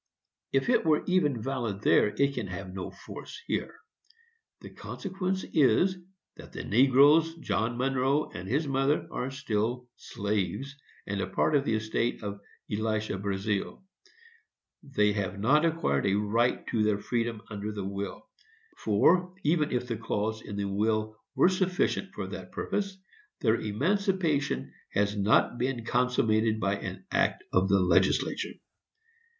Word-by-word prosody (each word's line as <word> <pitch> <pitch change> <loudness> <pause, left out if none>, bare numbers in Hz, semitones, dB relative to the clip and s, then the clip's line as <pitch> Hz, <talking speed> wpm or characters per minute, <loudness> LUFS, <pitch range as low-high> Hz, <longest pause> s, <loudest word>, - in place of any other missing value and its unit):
If 135 0 +1
it - - +4
were 155 -2 +3
even 150 -11 +1
valid 120 -7 -3
there, - - +4
it 140 +7 +1
can 105 - -3
have 90 +1 -7
no 95 -1 -5
force - - -10
here. - - -2 0.9
The - - -10
consequence 190 -1 -4
is, 175 +5 +4 0.4
that - - -12
the - - -5
negroes, 140 +7 +5
John 120 -7 -1
Monroe 135 +3 +1
and 90 +2 -7
his 145 +5 +1
mother, 135 +2 +1
are 125 - -3
still 125 -2 -2
slaves, 105 +7 -3 0.3
and 100 0 -2
a 95 - -2
part 150 +10 +1
of 140 -1 +2
the 110 - +1
estate 110 +2 -1
of 100 -1 -5 0.3
Elisha 110 -1 -1
Brazealle. 100 - -2 1.0
They 105 -7 +1
have 100 -1 -3
not 150 +10 +4
acquired 160 - +1
a 100 - +2
right 110 +4 +1
to 115 - +1
their 105 -1 +2
freedom 115 +1 -2
under 105 +1 -4
the 100 -2 -5
will; 100 - -5 0.5
for, 175 - +3
even 155 0 +2
if 125 0 -1
the 115 -2 -2
clause 110 0 -2
in 105 - -7
the 100 0 -2
will 110 +2 0 0.2
were - - +5
sufficient 185 -1 0
for - - -3
that - - -8
purpose, 200 -2 -3 0.4
their 110 -3 +4
emancipation 155 - 0 0.2
has 105 +1 +1
not 105 +4 +3
been 125 -2 -1
consummated 115 -3 +2
by 100 -1 0
an - - -7
act - - +1
of 95 +1 +3
the 100 0 +4
legislature. 90 +1 +2
115 Hz, 145 wpm, -29 LUFS, 105-140 Hz, 1.0 s, negroes